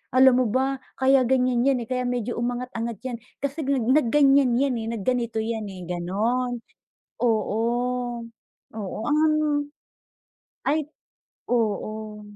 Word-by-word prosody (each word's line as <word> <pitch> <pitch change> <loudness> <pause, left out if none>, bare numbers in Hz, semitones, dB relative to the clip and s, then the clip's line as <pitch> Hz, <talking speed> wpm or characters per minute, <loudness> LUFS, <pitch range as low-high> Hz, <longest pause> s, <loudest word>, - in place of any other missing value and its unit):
Alam 255 -1 +6
mo - - -1
ba, 265 +1 0 0.2
kaya 265 0 +5
ganiyan 250 -1 +2
'yan, 255 -3 +2
eh, 225 - -12
kaya 250 0 0
medyo 245 -1 -2
umangat-angat 240 -2 -3
'yan, 255 -2 -3 0.3
kasi 280 +3 -2
nag 270 -3 +1
nag-ganiyan 275 -1 +4
'yan, 275 -2 +1
eh, 225 - -4
nag-ganito 235 +1 -1
'yan, 225 -1 -2
eh, 190 -2 -8
gano'n. 225 +8 -1 0.6
Oo. 220 -2 +1 1.1
Oo, 210 -3 -5
an 305 +1 +3 1.3
ay, 300 +1 +1 0.6
oo. 215 -2 -1
245 Hz, 120 wpm, -25 LUFS, 225-265 Hz, 1.3 s, Alam